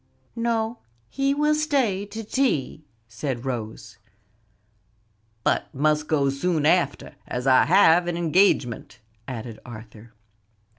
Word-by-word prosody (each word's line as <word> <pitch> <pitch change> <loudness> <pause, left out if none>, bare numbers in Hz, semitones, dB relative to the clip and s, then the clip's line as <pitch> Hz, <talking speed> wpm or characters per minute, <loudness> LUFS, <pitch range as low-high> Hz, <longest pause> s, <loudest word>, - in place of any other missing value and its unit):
"No, 230 0 -1 0.3
he 275 0 0
will 300 +1 +2
stay 270 -11 0
to 220 +2 -7
tea," 205 - -1 0.2
said 125 +1 -5
Rose. 115 -4 -6 1.4
"But - - 0
must 150 +2 +1
go 140 -3 +1
soon 155 +2 -1
after, 160 -3 +1
as 125 +1 -4
I 130 -1 +5
have 175 0 +5
an 175 -1 -2
engagement," 165 - +1 0.3
added 115 -3 -7
Arthur. 115 -1 -12
155 Hz, 110 wpm, -24 LUFS, -, 1.4 s, I